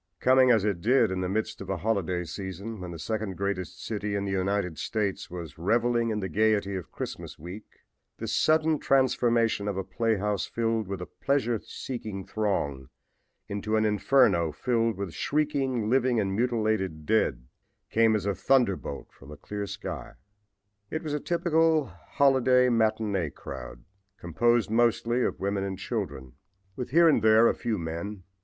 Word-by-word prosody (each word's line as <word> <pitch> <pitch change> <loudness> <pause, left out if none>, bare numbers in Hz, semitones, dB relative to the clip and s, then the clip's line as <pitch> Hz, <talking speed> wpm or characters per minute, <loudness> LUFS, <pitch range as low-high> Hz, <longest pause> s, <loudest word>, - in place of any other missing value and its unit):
Coming, 130 0 +5
as 110 -4 +4
it 100 -5 -1
did, 125 -1 +3
in 95 0 -2
the 90 - -1
midst 110 +1 -2
of 95 - -8
a 95 - -1
holiday 90 -3 -1
season, 95 +5 -6
when 90 - -6
the 85 - -7
second 100 +4 -3
greatest 100 -2 -3
city 105 -2 -3
in 100 0 -1
the 100 - -2
United 95 -3 -1
States 105 -4 -2
was 85 -3 -8
reveling 115 +5 +2
in 105 -1 -1
the 95 - -2
gaiety 105 +1 +1
of 90 -3 -6
Christmas - - -6
week, 90 +7 -11 0.4
this - - -3
sudden 155 -1 +3
transformation 120 -5 +2
of 100 -2 -2
a 95 - -1
playhouse 105 0 -1
filled 115 -2 -1
with 95 -2 -4
a - - -6
pleasure 120 -3 -1
seeking 110 -7 -6
throng 70 -11 -2 0.6
into 105 +2 -2
an 110 0 +2
inferno 105 - +3
filled 115 +4 0
with 100 -4 -4
shrieking 135 -6 0
living 125 0 +2
and 95 -2 -1
mutilated 110 -9 0
dead, 75 - +1 0.5
came 110 -1 +4
as 105 - -2
a 100 - +1
thunderbolt 100 - 0
from 70 - -16
a 75 - -9
clear 105 -1 -5
sky. 100 -8 -6 0.8
It 160 - -4
was 150 -2 -3
a 150 - 0
typical 165 -2 +2 0.2
holiday 130 -2 +4
matinee 110 -6 +1
crowd, - - -9 0.3
composed 115 +6 +1
mostly 120 +1 +2
of - - -1
women 100 0 -1
and 95 -1 -4
children, 80 - -4 0.4
with 125 - -5
here 170 +5 +5
and 150 -8 +4
there 110 +2 +6
a - - +3
few 115 -3 -2
men. 85 +4 -5
105 Hz, 165 wpm, -27 LUFS, 95-120 Hz, 0.8 s, there